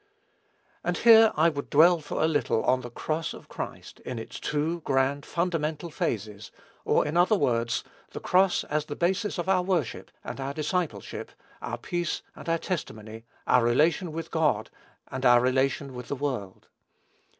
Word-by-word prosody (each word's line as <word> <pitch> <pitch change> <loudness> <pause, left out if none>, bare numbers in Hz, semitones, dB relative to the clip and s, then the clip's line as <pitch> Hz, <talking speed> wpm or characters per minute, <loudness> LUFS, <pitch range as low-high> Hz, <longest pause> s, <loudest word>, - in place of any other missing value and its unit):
And - - -1
here 225 -1 +7
I 160 +2 +4
would 140 -3 -5
dwell 170 +4 +6
for 150 0 -3
a - - +4
little 145 -7 +1
on 130 0 +2
the 120 - -7
cross 155 +6 -3
of - - -13
Christ - - -7
in 125 - -6
its 115 - -7
two 155 +3 -1
grand, 135 +1 0
fundamental 165 -2 -2
phases, 105 -5 -3 0.3
or - - +2
in 150 - -3
other 180 +5 +5
words, 120 - 0 0.3
the - - -7
cross 185 0 +3
as 150 0 -2
the 145 - -6
basis 190 +6 0
of 175 - -3
our 190 -1 +3
worship 180 - -2
and - - -6
our 135 +1 -4
discipleship, 155 - -3 0.3
our - - -4
peace 175 -1 -3
and - - -8
our 165 - +2
testimony, 110 - -5 0.2
our 125 -1 +4
relation 155 +8 +2
with 165 +1 -6
God, 150 -10 +1 0.4
and 130 0 -5
our 120 -1 +7
relation 130 +2 0
with 125 0 -8
the - - -2
world. 130 -9 -4
150 Hz, 170 wpm, -27 LUFS, 125-170 Hz, 0.4 s, here